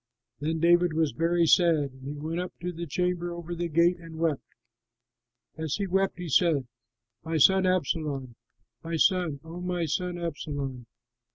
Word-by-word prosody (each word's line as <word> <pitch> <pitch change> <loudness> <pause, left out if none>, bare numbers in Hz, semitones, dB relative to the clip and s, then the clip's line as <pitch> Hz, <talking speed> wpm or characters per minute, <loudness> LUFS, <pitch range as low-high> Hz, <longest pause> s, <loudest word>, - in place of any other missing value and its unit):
Then 160 +2 -1
David 175 0 +4
was 160 -2 +1
very 165 +7 +2
sad 170 0 +5 0.3
and 145 +2 -7
went 165 +2 -2
up 180 0 -4
to 180 - -2
the 170 +1 -6
chamber 175 +2 -1
over 170 0 -6
the 175 0 -2
gate 170 +3 +3
and 165 -2 -10
wept. 160 -4 0 1.2
As 160 -3 -1
he 200 - -2
wept 195 +1 0
he 180 -1 -5
said, 155 -2 +3 0.6
"My 160 0 -1
son 190 +5 +5
Absalom, 150 -7 -1 0.5
my 165 0 -3
son, 165 -3 +2
O 165 +2 -8
my 180 -1 -1
son 175 +3 -2
Absalom! 145 -7 -4
170 Hz, 160 wpm, -27 LUFS, 155-175 Hz, 1.2 s, sad